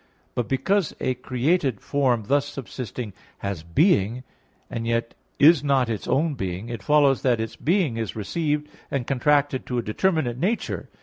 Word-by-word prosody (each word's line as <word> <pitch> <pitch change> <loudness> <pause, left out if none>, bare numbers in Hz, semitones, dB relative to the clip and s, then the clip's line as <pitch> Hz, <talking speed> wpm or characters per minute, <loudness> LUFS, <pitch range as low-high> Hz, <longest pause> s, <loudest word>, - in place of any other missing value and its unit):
But 120 - -1
because 190 +7 +1
a 130 - 0
created 130 - 0
form 130 -4 +1
thus 140 +4 +2
subsisting 125 -5 -6 0.2
has 100 -5 -4
being, 110 - +2 0.4
and 115 0 -4
yet 115 0 0 0.2
is 150 -1 +6
not 135 -4 +2
its 110 -3 -3
own 155 +3 +2
being, 95 -2 -4
it 115 -4 -5
follows 145 +2 +4
that 125 -3 +2
its 110 -1 -3
being 165 - +1
is 110 -3 -3
received 150 - -1 0.2
and 135 -4 -2
contracted 140 0 +1
to 125 - -2
a 120 - 0
determinate 125 - 0
nature. 205 - -1
130 Hz, 160 wpm, -24 LUFS, 115-150 Hz, 0.4 s, is